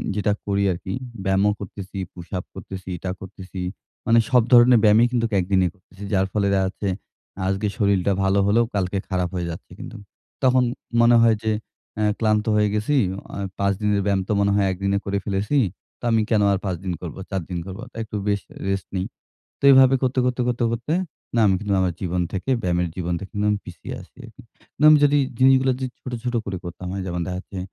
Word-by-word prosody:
যেটা 105 Hz, 0 st, +1 dB
করি 100 Hz, 0 st, +1 dB
আরকি 90 Hz, +2 st, -5 dB, 0.3 s
ব্যায়ামও 95 Hz, +1 st, +3 dB
করতেছি, 100 Hz, 0 st, -8 dB, 0.2 s
পুশ-আপ 90 Hz, +1 st, -6 dB
করতেছি, 95 Hz, -1 st, -8 dB
এটা 95 Hz, -, -5 dB
করতেছি, 95 Hz, -1 st, -8 dB, 0.4 s
মানে 115 Hz, 0 st, +5 dB
সব 125 Hz, -1 st, +5 dB
ধরনের 120 Hz, 0 st, +8 dB
ব্যায়ামই 110 Hz, +2 st, +6 dB
কিন্তু 120 Hz, -2 st, +1 dB
একদিনে 95 Hz, 0 st, +2 dB
করতেছি, 95 Hz, +1 st, -15 dB
যার 95 Hz, -1 st, +3 dB
ফলে 100 Hz, -2 st, +1 dB
দেখা 95 Hz, -1 st, +2 dB
যাচ্ছে 100 Hz, +1 st, -5 dB, 0.6 s
আজকে 95 Hz, +2 st, 0 dB
শরীরটা 100 Hz, -3 st, +2 dB
ভালো 95 Hz, +1 st, +3 dB
হলেও 110 Hz, +3 st, +4 dB
কালকে 95 Hz, 0 st, 0 dB
খারাপ 90 Hz, -2 st, 0 dB
হয়ে 90 Hz, -1 st, -2 dB
যাচ্ছে 85 Hz, -, -10 dB
কিন্তু, 115 Hz, -, -8 dB, 0.5 s
তখন 130 Hz, 0 st, +4 dB
তো 120 Hz, -, -6 dB
মনে 120 Hz, 0 st, +6 dB
হয় 115 Hz, -1 st, +5 dB
যে 110 Hz, -, +1 dB, 0.5 s
আ -, -, +2 dB, 0.2 s
ক্লান্ত 110 Hz, -2 st, +2 dB
হয়ে 105 Hz, 0 st, +3 dB
গেছি 105 Hz, +7 st, 0 dB, 0.4 s
এ -, -, -3 dB, 0.2 s
৫ 100 Hz, 0 st, +2 dB
দিনের 105 Hz, -1 st, +2 dB
ব্যায়াম 100 Hz, -1 st, +2 dB
তো -, -, -2 dB
মনে 100 Hz, 0 st, +3 dB
হয় 100 Hz, -1 st, +3 dB
একদিনে 100 Hz, +2 st, 0 dB
করে 100 Hz, 0 st, -1 dB
ফেলেছি, 100 Hz, +7 st, 0 dB, 0.4 s
তো -, -, -33 dB
আমি 115 Hz, -, +3 dB
কেন 110 Hz, -2 st, +3 dB
আর -, -, +1 dB
৫ 95 Hz, -2 st, -1 dB
দিন 90 Hz, -, -1 dB
করবো, 85 Hz, 0 st, -7 dB
৪ 95 Hz, -2 st, -2 dB
দিন 90 Hz, -, -3 dB
করবো, 95 Hz, +4 st, -7 dB
তো -, -, -35 dB
একটু 110 Hz, -, -8 dB
বেশ 100 Hz, -1 st, +1 dB, 0.3 s
রেস্ট 95 Hz, -1 st, -2 dB
নেই, 95 Hz, 0 st, -1 dB, 0.5 s
তো -, -, -27 dB
এভাবে 135 Hz, 0 st, +7 dB
করতে, 130 Hz, 0 st, +1 dB
করতে, 125 Hz, 0 st, 0 dB
কর, 125 Hz, -, +2 dB
তে -, -, +1 dB
করতে 115 Hz, +5 st, -3 dB, 0.4 s
ব্যায়াম 110 Hz, -4 st, +4 dB
কিন্তু 105 Hz, 0 st, -2 dB
আমার 90 Hz, -2 st, 0 dB
জীবন 90 Hz, -1 st, -1 dB
থেকে 95 Hz, +7 st, -3 dB
ব্যায়ামের 90 Hz, -1 st, 0 dB
জীবন 90 Hz, -1 st, -2 dB
থেকে 100 Hz, -, -9 dB, 0.2 s
আমি 105 Hz, -, +2 dB
পিছিয়ে 85 Hz, -2 st, -8 dB
আছি, -, -, -18 dB, 0.6 s
না -, -, 0 dB
আমি 155 Hz, -, +8 dB
যদি 145 Hz, +1 st, +3 dB, 0.2 s
জিনিসগুলো 130 Hz, 0 st, +5 dB
যদি 130 Hz, 0 st, -3 dB
ছোট, 130 Hz, -, -7 dB
ছোট 125 Hz, -1 st, -2 dB
করে 95 Hz, -2 st, -3 dB
করতাম 90 Hz, +1 st, -7 dB
হয় 100 Hz, -, -3 dB
যেমন 90 Hz, -1 st, -2 dB
দেখা 90 Hz, 0 st, -3 dB
যাচ্ছে 95 Hz, 0 st, -8 dB
100 Hz, 205 wpm, -23 LUFS, 95-115 Hz, 0.6 s, ধরনের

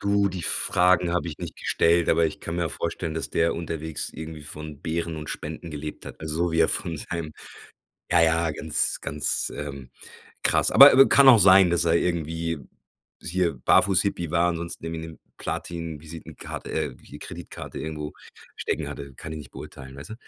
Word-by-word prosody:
Du, 100 Hz, 0 st, +2 dB
die 90 Hz, -2 st, -5 dB
Fragen 90 Hz, +1 st, +3 dB
habe 85 Hz, -1 st, -1 dB
ich 75 Hz, -, -7 dB
nicht 85 Hz, -3 st, -7 dB
gestellt, 85 Hz, 0 st, +2 dB
aber 85 Hz, -, +4 dB
ich 75 Hz, -, -6 dB
kann 85 Hz, +1 st, -5 dB
mir 85 Hz, -2 st, 0 dB
vorstellen, 80 Hz, +3 st, -4 dB
dass 80 Hz, -, -4 dB
der 85 Hz, 0 st, +1 dB
unterwegs 80 Hz, -2 st, -4 dB
irgendwie 80 Hz, -1 st, -8 dB
von 75 Hz, -1 st, -9 dB
Beeren 85 Hz, 0 st, -2 dB
und 75 Hz, 0 st, -6 dB
Spenden 80 Hz, +2 st, -6 dB
gelebt 75 Hz, 0 st, -7 dB
hat, -, -, -10 dB
äh, -, -, -4 dB
so 80 Hz, +2 st, -1 dB
wie 80 Hz, -, +2 dB
er 80 Hz, -, +5 dB
von 85 Hz, -4 st, -2 dB
seinem 80 Hz, -1 st, -5 dB, 0.8 s
ja, 85 Hz, -, +5 dB
ja, 80 Hz, 0 st, +2 dB
ganz, 75 Hz, +1 st, -1 dB
ganz, -, -, -2 dB
ähm, 70 Hz, -3 st, -7 dB, 0.5 s
krass, -, -, +2 dB
aber, -, -, +10 dB
äh, -, -, +4 dB
w 135 Hz, -, +9 dB
kann 140 Hz, -1 st, +7 dB
auch 120 Hz, -, +9 dB
sein, 95 Hz, -2 st, +7 dB
dass 85 Hz, 0 st, +2 dB
er 80 Hz, -, +3 dB
irgendwie 85 Hz, -2 st, -1 dB, 0.6 s
hier 90 Hz, -2 st, 0 dB
Barfuß-Hippie 90 Hz, +5 st, +2 dB
war, 85 Hz, +1 st, +3 dB
ansonsten 85 Hz, -1 st, -4 dB
irgendwie 80 Hz, 0 st, -4 dB
'ne 80 Hz, -, -12 dB, 0.2 s
Platin-Visitenkarte 80 Hz, -1 st, -6 dB
äh, -, -, -2 dB
j -, -, -12 dB
Kreditkarte -, -, -8 dB
irgendwo 75 Hz, -1 st, -5 dB, 0.4 s
stecken 75 Hz, -2 st, -2 dB
hatte, 70 Hz, -2 st, -8 dB
kann 80 Hz, +4 st, -8 dB
ich 80 Hz, -, -5 dB
nicht 75 Hz, -4 st, -11 dB
beurteilen, 65 Hz, 0 st, -10 dB
weißt 70 Hz, +9 st, -10 dB
du? -, -, -5 dB
80 Hz, 185 wpm, -25 LUFS, 75-85 Hz, 0.8 s, aber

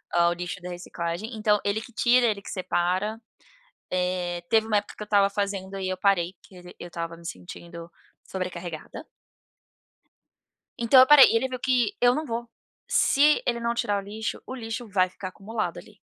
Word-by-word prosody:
o 170 Hz, 0 st, +4 dB
lixo 175 Hz, +1 st, -6 dB
da 180 Hz, -, -7 dB
reciclagem. 175 Hz, +5 st, -5 dB
Então 210 Hz, -1 st, +2 dB
ele 205 Hz, +2 st, 0 dB
que 240 Hz, -, -12 dB
tira, 245 Hz, +2 st, +4 dB
ele 205 Hz, -2 st, -1 dB
que -, -, -10 dB
separa. 185 Hz, +3 st, -1 dB, 0.7 s
Eh, 180 Hz, -1 st, -1 dB
teve 220 Hz, -1 st, +4 dB
uma 215 Hz, -2 st, +2 dB
época -, -, -4 dB
que 210 Hz, -, -5 dB
eu -, -, -8 dB
estava 200 Hz, -1 st, +3 dB
fazendo 195 Hz, -1 st, -3 dB
e 185 Hz, 0 st, -2 dB
eu 185 Hz, -, -2 dB
parei, 185 Hz, -2 st, +1 dB
que 190 Hz, -, -18 dB
ele 180 Hz, 0 st, -13 dB
eu 175 Hz, -, -7 dB
estava 165 Hz, -1 st, -5 dB
me 170 Hz, -, -15 dB
sentindo 170 Hz, -, -9 dB, 0.4 s
sobrecarregada. 175 Hz, -3 st, -6 dB, 1.7 s
Então, 235 Hz, +3 st, +6 dB
eu 260 Hz, -, +8 dB
parei 295 Hz, -2 st, +10 dB
e -, -, +1 dB
ele 260 Hz, +3 st, +2 dB
viu 255 Hz, -1 st, -6 dB
que 255 Hz, -, +1 dB
eu 245 Hz, +1 st, +5 dB
não 310 Hz, -, -2 dB
vou, 235 Hz, -2 st, -4 dB, 0.4 s
se 295 Hz, +2 st, +4 dB
ele 235 Hz, -1 st, 0 dB
não 235 Hz, 0 st, -1 dB
tirar 205 Hz, -3 st, 0 dB
o -, -, -14 dB
lixo, 215 Hz, +2 st, -5 dB
o 260 Hz, -, -6 dB
lixo 230 Hz, 0 st, -5 dB
vai 185 Hz, -3 st, +2 dB
ficar 185 Hz, +1 st, -7 dB
acumulado 215 Hz, +4 st, -4 dB
ali. -, -, -13 dB
200 Hz, 190 wpm, -26 LUFS, 180-230 Hz, 1.7 s, parei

